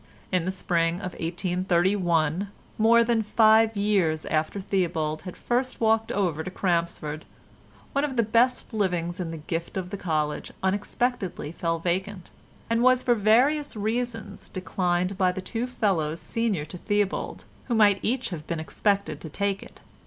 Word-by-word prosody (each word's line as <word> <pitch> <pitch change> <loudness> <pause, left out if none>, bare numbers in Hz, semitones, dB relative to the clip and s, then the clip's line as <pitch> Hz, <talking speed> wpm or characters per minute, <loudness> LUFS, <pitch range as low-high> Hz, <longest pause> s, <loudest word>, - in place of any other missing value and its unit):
In 180 -3 +1
the - - 0
spring 170 -3 +1
of 185 0 -5
1831, 175 0 +1 0.3
more 230 +2 +6
than 230 -1 +2
five 220 0 +4
years 190 -7 +1
after 155 +5 -1
Theobald 170 -5 -1
had - - -11
first 250 +2 -1
walked 225 0 +2
over 170 -6 0
to 185 - -5
Crampsford, 170 -4 -1 0.7
one 280 - +1
of 285 -3 -2
the 235 - +3
best 235 +3 +2
livings 180 -4 -1
in 175 -3 -3
the 165 - -5
gift 165 +4 -4
of 180 -1 -4
the 200 - -3
College 155 -5 -2
unexpectedly 200 -3 -1
fell 165 0 -1
vacant, 185 +2 -3 0.4
and 230 0 +1
was 255 0 +5
for 245 - +4
various 250 +8 +3
reasons 220 -1 -3
declined 185 0 -1
by 185 -1 +4
the 185 - -5
two 225 +6 -3
fellows 170 -10 0
senior 220 -10 -1
to 175 +3 -9
Theobald, 205 -1 -1 0.2
who 240 - -1
might 205 -3 +5
each 255 +3 -1
have 165 -5 -7
been 170 -2 -2
expected 200 +5 -1
to 160 - -6
take 200 +4 -1
it. - - -13
190 Hz, 160 wpm, -26 LUFS, 170-220 Hz, 0.7 s, more